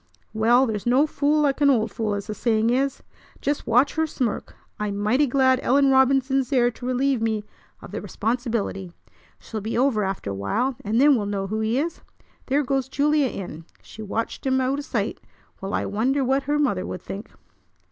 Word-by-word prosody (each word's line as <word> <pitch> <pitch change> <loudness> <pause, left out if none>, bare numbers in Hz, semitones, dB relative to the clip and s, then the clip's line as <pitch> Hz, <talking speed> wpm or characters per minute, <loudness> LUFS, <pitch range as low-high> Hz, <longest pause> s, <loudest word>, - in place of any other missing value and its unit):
"Well, 235 +4 +4
there's 220 -2 -3
no 260 +5 +4
fool 300 0 +1
like 285 -1 +1
an 285 - +6
old 225 -5 +2
fool, 215 -2 -2
as 200 - -5
the 215 - -4
saying 225 0 +1
is! 270 +2 0 0.4
Just 290 +1 -2
watch 245 +5 +3
her 320 0 0
smirk! 250 -7 -3 0.2
I'm 205 -1 -2
mighty 235 +8 +2
glad 260 0 +3
Ellen 275 +2 +3
Robinson's 265 0 +3
there 245 -3 +3
to 245 +2 -8
relieve 255 -1 +1
me 220 -2 0 0.4
of - - -10
the - - -4
responsibility. 225 -6 -2 0.4
She'll 220 -2 -7
be 220 +3 -3
over 245 -4 +2
after 190 - -3
a - - -3
while, 225 - -1
and 215 +3 0
then 285 +1 +6
we'll 210 -4 -1
know 200 -1 -2
who 215 +3 -3
he 220 +3 0
is. 330 +4 -2 0.5
There 280 +2 +2
goes 270 -1 -1
Julia 290 +1 +2
in. 165 -8 -7 0.2
She 220 - -11
watched 220 +2 -4
him 260 0 +2
out 260 +2 0
o' - - -2
sight! 285 - -3 0.4
Well, 195 +1 -3
I - - -1
wonder 255 +7 0
what 270 +2 +1
her 295 - +2
mother 245 -11 +1
would 185 - -6
think." 200 +3 -7
245 Hz, 200 wpm, -24 LUFS, 215-275 Hz, 0.5 s, an